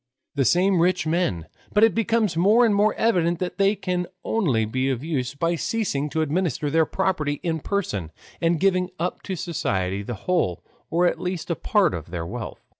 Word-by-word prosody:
The 140 -2 +1
same 185 +3 +3
rich 180 -1 +2
men, 155 - 0 0.3
but 210 - +4
it 225 - +6
becomes 225 -4 +1
more 210 +8 +5
and 220 - +3
more 205 +2 +3
evident 175 -7 +2
that 180 +3 -4
they 200 +1 +4
can 180 -2 -2 0.2
only 140 - +1
be 130 +5 -1
of 130 -1 -2
use 140 -5 -2
by 165 +4 0
ceasing 165 -5 -1
to 160 +1 0
administer 155 -1 -1
their 160 +1 +3
property 155 -7 -1
in 165 -2 -1
person 105 - -2 0.3
and 165 -1 +2
giving 185 -1 +2
up 175 +3 -3
to 190 - -4
society 100 - -2
the 115 +3 -5
whole 170 - 0 0.3
or 175 +2 +2
at 175 - 0
least 180 -2 -3
a - - +1
part 205 +1 +2
of 80 -2 -6
their 85 -1 -4
wealth. 110 +4 -7
170 Hz, 190 wpm, -24 LUFS, 140-190 Hz, 0.3 s, it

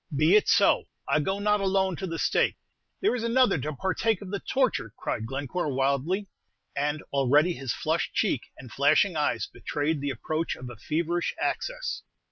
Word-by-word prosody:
"Be 155 +7 +5
it 210 - +4
so; 215 -3 +4 0.2
I - - +3
go 190 +7 -1
not 210 0 +2
alone 190 -1 +1
to 190 - -4
the 165 -1 -4
stake; - - +2 0.5
there 385 - +3
is 235 - -3
another 235 -6 +3
to 150 +4 -3
partake 190 - 0
of 190 - -8
the 200 - -2
torture," 255 - 0
cried 110 0 -3
Glencore, 140 +5 -2
wildly; 140 +9 0 0.5
and 145 +1 -1
already 145 +5 +4
his 135 -6 -4
flushed - - -1
cheek - - +1 0.2
and 125 -3 -11
flashing 155 - +3
eyes 120 -8 0
betrayed 150 0 -2
the 145 - -1
approach 155 +6 -2
of 125 -1 -8
a - - -9
feverish 170 +8 -1
access. - - -2
160 Hz, 175 wpm, -27 LUFS, 140-195 Hz, 0.5 s, Be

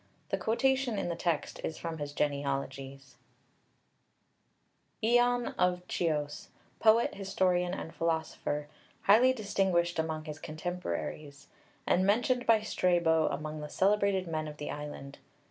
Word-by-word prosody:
The - - 0
quotation 260 0 +1
in 175 - -1
the 170 - -2
text 170 -3 -2
is 160 - -3
from 165 -1 -5
his 145 -1 -4
genealogies 140 -1 -3 1.9
(Lübker). 240 +2 +5
ION 245 0 +2
of 180 0 +2
Chios, 150 -4 -2 0.3
poet, 225 +1 +4
historian, 185 -2 0
and 160 - -7
philosopher, 160 -2 -2 0.4
highly 230 +6 +6
distinguished 190 -7 0
among 160 -1 -2
his 155 -1 -7
contemporaries, 155 - -5 0.4
and 185 - +3
mentioned 245 +5 +2
by 225 -2 +5
Strabo 170 -6 +2
among 155 +1 -4
the 150 - -6
celebrated 200 -1 +2
men 155 -1 -2
of 150 0 -8
the 150 - -5
island. 145 -2 -7
170 Hz, 130 wpm, -31 LUFS, 150-200 Hz, 1.9 s, highly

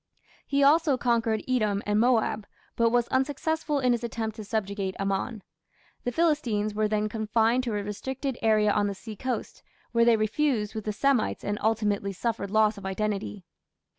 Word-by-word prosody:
He 280 0 +2
also 295 -1 +4
conquered 230 -3 +1
Edom 215 -6 +1
and 210 0 +1
Moab, 225 -3 +2 0.3
but 230 0 +3
was 240 0 +2
unsuccessful 290 +3 0
in 250 -2 +2
his 240 0 0
attempt 220 -2 -3
to 215 - -6
subjugate 200 -2 -2
Ammon. 195 +2 -2 0.6
The 245 - 0
Philistines 240 -10 +1
were 215 0 +1
then 210 0 0
confined 225 +3 +1
to 235 - -2
a 205 - -2
restricted 265 +6 -4
area 215 -1 +3
on 205 0 +1
the 200 - -3
seacoast, 230 +5 -5 0.3
where 235 -1 +3
they 230 -1 +5
fused 220 -3 0
with 220 -2 -5
the 215 - -1
Semites 255 +2 +1
and 205 0 -2
ultimately 210 -2 0
suffered 215 0 -2
loss 215 0 +2
of 195 - -11
identity. 200 -1 -3
220 Hz, 165 wpm, -27 LUFS, 210-245 Hz, 0.6 s, they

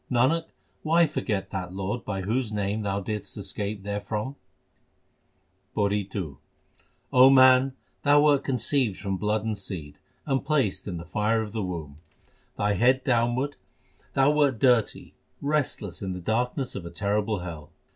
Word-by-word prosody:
Nanak, 135 +7 +2 0.4
why 165 +2 +4
forget 105 -9 -2
that 90 -2 -5
Lord 100 +5 -3
by 95 -2 -3
whose 110 +4 -1
name 105 +1 -1
thou 100 -1 -1
didst 105 +2 -5
escape 100 +1 -4
therefrom? 105 +5 -3 1.4
PAURI 100 -1 0
II 80 -9 -4 0.8
O 130 +1 +8
man, 130 0 +6 0.3
thou 145 0 +5
wert 145 -2 +4
conceived 125 -4 0
from 100 -2 -2
blood 105 +2 0
and 110 -1 -1
seed, 90 -7 -7 0.3
and 135 -2 0
placed 135 -11 0
in 90 -3 -3
the 85 - -8
fire 110 +3 +1
of 105 - -7
the 110 0 -3
womb. 80 -6 -5 0.6
Thy 105 0 +1
head 125 +6 +3
downwards, 125 +3 +1 0.6
thou 135 +1 +4
wert 145 -4 +2
dirty, 120 -3 +2 0.3
restless 140 - -1
in 95 -2 -3
the 90 - -5
darkness 125 +7 -1
of 100 - -6
a 85 - -7
terrible 100 +2 -1
hell. 80 -4 -7
105 Hz, 150 wpm, -26 LUFS, 100-130 Hz, 1.4 s, O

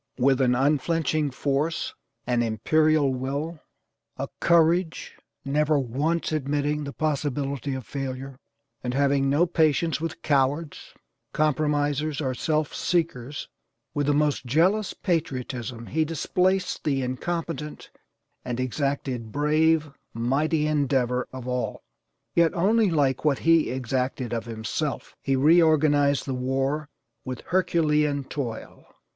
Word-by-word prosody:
With 135 +1 +3
an 125 -1 +3
unflinching 150 +3 +1
force, 140 +4 -1 0.3
an 120 -1 +1
imperial 145 +6 +2
will, 140 +6 -3 0.6
a - - -4
courage 170 0 +2 0.3
never 150 +2 +2
once 145 +7 -1
admitting 145 0 -1
the 140 - -5
possibility 140 -2 -2
of 130 -3 -6
failure, 135 -1 -5 0.4
and 125 0 -2
having 140 0 +2
no 150 +5 +4
patience 160 -2 +1
with 165 - -5
cowards, 145 +2 0 0.4
compromisers 150 -1 +1
or 130 -4 -1
self 155 +3 -1
seekers; 150 -6 -1 0.5
with 145 -1 -1
the 145 - +4
most 150 -1 +1
jealous 185 - +2
patriotism 125 - -3
he 160 +6 0
displaced 180 +4 0
the 135 -3 0
incompetent 150 +3 -4 0.5
and 120 0 -4
exacted 130 -3 -2
brave, 155 +2 +2 0.2
mighty, 150 +7 +1
endeavor 135 -4 +1
of 130 -1 -8
all, 125 0 -3 0.5
yet 170 -1 +4
only 210 +4 +3
like 140 -6 +1
what 150 -3 +3
he 165 -1 +5
EXACTED 130 -1 -2
OF 115 -1 -3
HIMSELF. 115 +6 -4
He 135 - +1
reorganized 145 -1 +4
the 135 - -2
war 135 +4 -1 0.3
with 130 -1 -5
HERCULEAN 150 -5 +2
TOIL. 125 -5 -6
145 Hz, 115 wpm, -25 LUFS, 130-155 Hz, 0.6 s, he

